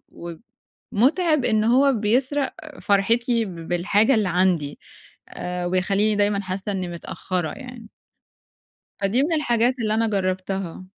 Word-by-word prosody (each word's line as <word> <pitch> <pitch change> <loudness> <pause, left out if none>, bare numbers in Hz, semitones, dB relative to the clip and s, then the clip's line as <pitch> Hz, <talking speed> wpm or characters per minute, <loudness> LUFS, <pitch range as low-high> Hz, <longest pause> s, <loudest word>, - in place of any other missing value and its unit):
و 170 -1 -9 0.6
مُتعِب 305 - +2
إن 220 -2 +2
هو 260 +4 +4
بيسرق 255 +6 +1 0.3
فرحتي 230 +4 +2
ب 170 -4 -8
بالحاجة 205 +8 +2
اللي 210 -4 +1
عندي 175 -5 0 0.5
آآ 180 0 -5
وبيخلّيني 195 +4 +1
دايمًا 205 0 +1
حاسّة 190 +2 -4
إنّي 185 -2 -3
متأخرّة 175 0 -4
يعني. 250 -4 -10 1.1
فدي 205 +7 +2
من 330 - 0
الحاجات 245 -5 +2
اللي 215 -2 0
أنا 225 +1 +2
جرّبتها. 185 -2 -3
205 Hz, 125 wpm, -23 LUFS, 185-240 Hz, 1.1 s, هو